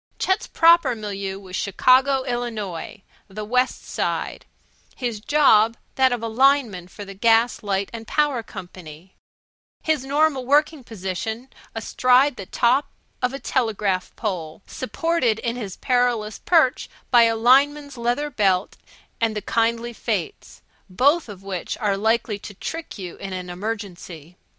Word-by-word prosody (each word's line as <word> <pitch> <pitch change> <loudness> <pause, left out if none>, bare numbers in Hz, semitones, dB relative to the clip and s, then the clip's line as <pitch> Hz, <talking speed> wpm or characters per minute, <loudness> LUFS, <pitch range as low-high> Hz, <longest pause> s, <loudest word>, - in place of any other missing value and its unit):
Chet's 380 +4 0
proper 335 -6 +4
milieu 200 -3 -5
was 190 -2 -9
Chicago, 260 +7 +3
Illinois 220 -7 -4 0.2
(the 210 +2 -7
West 250 +4 0
Side); - - -3 0.5
his 240 -5 -3
job 230 -3 +4 0.2
that 260 -1 +3
of 245 -2 -2
lineman 230 -5 +2
for 205 +3 -10
the 195 - -9
Gas, 225 +4 +3
Light 200 -1 -1
and 225 -1 -8
Power 295 -5 +1
Company; 180 -4 -11 0.7
his 310 -4 0
normal 285 0 +1
working 290 +2 +2
position 220 +4 -5 0.3
astride 250 +4 +3
the 195 - -8
top 255 +5 +2 0.3
of 250 0 +1
a 270 - -5
telegraph 210 -8 -1
pole 180 -5 -4
supported 260 -4 -1
in 235 +1 -3
his 210 -7 -6
perilous 245 -4 0
perch 310 -6 +2 0.2
by 240 -2 +7
a 225 0 +2
lineman's 280 +4 +3
leather 245 +5 -1
belt 195 -5 +1 0.4
and 225 -1 +1
the 210 - -2
kindly 235 +1 0
fates, 410 - -4 0.3
both 280 - +2
of 195 -2 -10
which 190 -3 -4
are 205 -2 0
likely 220 0 0
to 205 - -10
trick 325 - -6
you 180 -3 -7
in 195 -1 -6
an 180 -1 -5
emergency. 180 -5 -6
230 Hz, 140 wpm, -23 LUFS, 195-260 Hz, 0.7 s, by